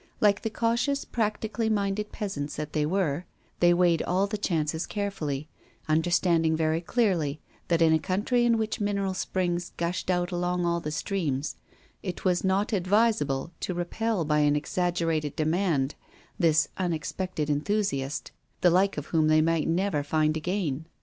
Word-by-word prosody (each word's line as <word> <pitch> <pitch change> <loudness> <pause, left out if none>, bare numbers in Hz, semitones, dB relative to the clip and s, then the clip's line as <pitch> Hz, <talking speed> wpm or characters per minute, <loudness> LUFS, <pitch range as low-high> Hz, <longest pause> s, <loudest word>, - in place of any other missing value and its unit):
Like 200 -1 +3
the 225 - -2
cautious, 235 +6 0
practically 220 0 -1
minded 210 0 -1
peasants 150 -9 -4
that 150 0 -5
they 150 -1 +1
were, 175 -2 0 0.3
they 175 0 +5
weighed 175 -2 +3
all 185 +3 +1
the 205 +2 -3
chances 160 -5 -1
carefully, 155 -9 -3 0.4
understanding 165 0 +2
very 160 +1 +1
clearly 170 - 0 0.3
that 165 -1 +3
in 160 -1 +5
a 160 - +4
country 205 +8 +1
in 235 -1 +3
which 220 -1 -2
mineral 200 -2 0
springs 175 -1 -2
gushed 170 +2 -2
out 180 0 +1
along 175 0 0
all 170 0 +1
the 155 - -4
streams, 150 -3 -2 0.5
it 185 0 -6
was 180 -1 +2
not 195 +4 +1
advisable 180 -7 +1
to 185 - -3
repel 185 +2 -1
by 150 0 +2
an 145 0 +3
exaggerated 165 -2 -1
demand 155 -3 +1 0.5
this 160 -4 +4
unexpected 175 -2 -2
enthusiast, 150 -2 -1 0.3
the 175 - +5
like 190 +2 +3
of 145 - -3
whom 160 -1 +4
they 155 0 +5
might 165 0 +2
never 170 -2 +1
find 155 +1 +1
again. 160 -3 -2
175 Hz, 155 wpm, -27 LUFS, 155-200 Hz, 0.5 s, they